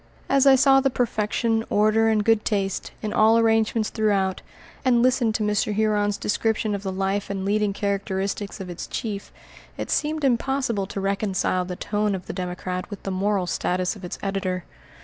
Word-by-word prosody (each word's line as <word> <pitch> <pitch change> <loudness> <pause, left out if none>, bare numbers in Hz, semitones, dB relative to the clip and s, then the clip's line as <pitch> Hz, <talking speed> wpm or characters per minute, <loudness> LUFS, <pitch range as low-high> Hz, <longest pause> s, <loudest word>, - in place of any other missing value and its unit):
As 275 0 +4
I 270 - +8
saw 270 +1 +5
the 270 - +2
perfection, 225 -1 0
order, 215 +2 +3
and 215 -2 +1
good 225 -1 +3
taste, 195 -3 -1
in 215 - -2
all 220 +1 +5
arrangements 225 -1 +2
throughout, 200 -4 0 0.4
and 245 -3 +3
listened 245 -3 +2
to 215 - 0
Mr. 210 0 0
Huron's 210 -1 +1
description 220 0 0
of 200 - -3
the 195 -1 -3
life 195 +1 -1
and 195 -1 -3
leading 210 0 +1
characteristics 200 0 -2
of 190 - -6
its 175 -1 -6
chief, 205 -3 -5 0.5
it - - -4
seemed 310 0 0
impossible 255 -5 0
to 200 - -5
reconcile 195 -2 0
the 180 0 -5
tone 210 +1 -1
of 185 - -7
the - - -6
Democrat 180 0 -4
with 205 - -8
the 195 - -3
moral 195 0 0
status 180 +2 -1
of 200 - -13
its 180 - -5
editor. 190 -2 -2
210 Hz, 180 wpm, -24 LUFS, 195-225 Hz, 0.5 s, I